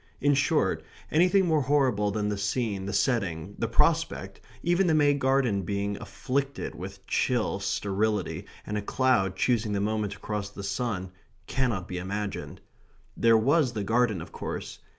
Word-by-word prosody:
In 145 Hz, 0 st, +3 dB
short, 145 Hz, +3 st, +2 dB, 0.3 s
anything 180 Hz, +4 st, +4 dB
more 160 Hz, -3 st, +3 dB
horrible 130 Hz, -7 st, +2 dB
than 105 Hz, 0 st, -1 dB
the 105 Hz, -, -1 dB
scene, 100 Hz, -2 st, -1 dB
the -, -, -2 dB
setting, 100 Hz, -, 0 dB
the 115 Hz, -, 0 dB
prospect, 115 Hz, -6 st, +1 dB, 0.2 s
even 175 Hz, +2 st, +3 dB
the 160 Hz, -, +3 dB
May 145 Hz, -1 st, +5 dB
garden 130 Hz, -7 st, +2 dB
being 100 Hz, +2 st, -2 dB
afflicted 135 Hz, 0 st, -3 dB
with 95 Hz, +1 st, -9 dB
chill 120 Hz, -6 st, 0 dB
sterility 100 Hz, 0 st, -1 dB, 0.2 s
and 105 Hz, 0 st, -2 dB
a -, -, -4 dB
cloud 100 Hz, -4 st, +2 dB
choosing 110 Hz, -1 st, +1 dB
that 100 Hz, -, 0 dB
moment 105 Hz, -1 st, -1 dB
to -, -, -13 dB
cross 105 Hz, -2 st, -3 dB
the 100 Hz, -1 st, -9 dB
sun, 100 Hz, -4 st, -2 dB, 0.3 s
cannot 120 Hz, -8 st, -1 dB
be 90 Hz, -1 st, -4 dB
imagined. 100 Hz, +2 st, -4 dB, 0.5 s
There 115 Hz, -1 st, +5 dB
was 135 Hz, +3 st, +3 dB
the 105 Hz, -2 st, -2 dB
garden, 110 Hz, -4 st, +1 dB
of -, -, -13 dB
course. -, -, -6 dB
110 Hz, 160 wpm, -28 LUFS, 100-130 Hz, 0.5 s, May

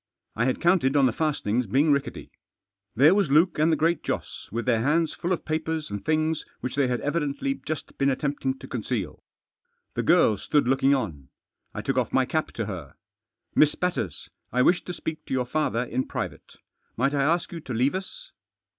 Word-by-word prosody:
I 115 Hz, -, +1 dB
had 130 Hz, -, 0 dB
counted 170 Hz, -6 st, +3 dB
on 140 Hz, -2 st, +5 dB
the 125 Hz, -, +3 dB
fastenings 125 Hz, -6 st, 0 dB
being 140 Hz, +9 st, +3 dB
rickety. 140 Hz, 0 st, -2 dB, 0.6 s
There 150 Hz, +7 st, +6 dB
was 195 Hz, -6 st, +2 dB
Luke 155 Hz, +4 st, +4 dB
and 155 Hz, +2 st, +4 dB
the -, -, +4 dB
Great 165 Hz, +1 st, +1 dB
Joss -, -, -5 dB
with 115 Hz, +2 st, -3 dB
their 115 Hz, -3 st, +2 dB
hands 155 Hz, +5 st, +2 dB
full 175 Hz, -, -3 dB
of 180 Hz, -, -1 dB
papers 160 Hz, -2 st, -2 dB
and 100 Hz, -1 st, -4 dB
things 155 Hz, 0 st, 0 dB, 0.2 s
which 125 Hz, 0 st, -4 dB
they 140 Hz, -1 st, +2 dB
had 125 Hz, -2 st, -1 dB
evidently 155 Hz, -, -1 dB
just 155 Hz, -1 st, -5 dB
been 140 Hz, 0 st, +3 dB
attempting 135 Hz, -1 st, -1 dB
to -, -, -11 dB
conceal, 115 Hz, -, -3 dB, 0.7 s
The -, -, -1 dB
girl 105 Hz, -, +4 dB
stood 145 Hz, +5 st, +1 dB
looking 135 Hz, +2 st, +4 dB
on, 80 Hz, -, -4 dB, 0.5 s
I -, -, -4 dB
took -, -, -1 dB
off -, -, +1 dB
|iiy -, -, +2 dB
cap -, -, 0 dB
to -, -, -3 dB
her. -, -, -7 dB, 0.3 s
" -, -, -58 dB
Miss 150 Hz, 0 st, +5 dB
Batters, 145 Hz, -, -2 dB, 0.2 s
I 125 Hz, +2 st, +3 dB
wish 175 Hz, +5 st, +3 dB
to 180 Hz, -, -5 dB
speak 160 Hz, -2 st, -5 dB
to -, -, -1 dB
your 125 Hz, -1 st, 0 dB
father 125 Hz, -3 st, 0 dB
in 130 Hz, +1 st, -2 dB
private. -, -, -6 dB, 0.4 s
Might 135 Hz, +4 st, +1 dB
I 140 Hz, -, +1 dB
ask 170 Hz, +5 st, +1 dB
you 170 Hz, -, -5 dB
to 140 Hz, -, -9 dB
leave 125 Hz, +4 st, +2 dB
us." -, -, -7 dB
140 Hz, 200 wpm, -26 LUFS, 125-160 Hz, 0.7 s, There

